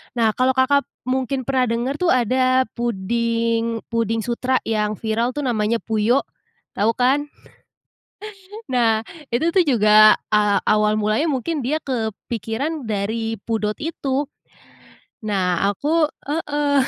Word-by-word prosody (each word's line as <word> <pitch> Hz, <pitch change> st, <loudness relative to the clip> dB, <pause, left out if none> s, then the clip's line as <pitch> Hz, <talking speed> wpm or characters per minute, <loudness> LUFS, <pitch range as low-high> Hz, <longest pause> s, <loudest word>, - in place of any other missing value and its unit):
Nah 225 Hz, -2 st, +3 dB
kalau 260 Hz, +1 st, +2 dB
Kakak 280 Hz, +2 st, +2 dB, 0.2 s
mungkin 260 Hz, 0 st, -1 dB
pernah 255 Hz, -1 st, +1 dB
denger 240 Hz, +4 st, -1 dB
tuh 360 Hz, -1 st, +2 dB
ada 255 Hz, +2 st, +2 dB
puding 230 Hz, +1 st, -1 dB
puding 225 Hz, -1 st, 0 dB
sutra 250 Hz, +2 st, -1 dB
yang 215 Hz, -1 st, -1 dB
viral 230 Hz, +2 st, -1 dB
tuh 290 Hz, -, -3 dB
namanya 220 Hz, -2 st, 0 dB
Puyo, 225 Hz, +4 st, +1 dB, 0.5 s
tau 220 Hz, +3 st, +1 dB
kan? 270 Hz, +4 st, +2 dB, 1.4 s
Nah, 230 Hz, -3 st, +2 dB, 0.3 s
itu 250 Hz, +7 st, +1 dB
tuh 370 Hz, -, +6 dB
juga, 215 Hz, -5 st, +6 dB
eee, 210 Hz, -1 st, +3 dB
awal 210 Hz, 0 st, +3 dB
mulanya 215 Hz, +8 st, +1 dB
mungkin 280 Hz, +2 st, -2 dB
dia 300 Hz, +5 st, +1 dB
kepikiran 235 Hz, +4 st, -4 dB
dari 220 Hz, +1 st, -2 dB
pudot 215 Hz, -2 st, -1 dB
itu. 285 Hz, -3 st, -2 dB, 1.0 s
Nah 185 Hz, -4 st, 0 dB
aku 305 Hz, -, +1 dB, 0.2 s
heeh. 295 Hz, -1 st, -1 dB
235 Hz, 120 wpm, -21 LUFS, 220-265 Hz, 1.4 s, tuh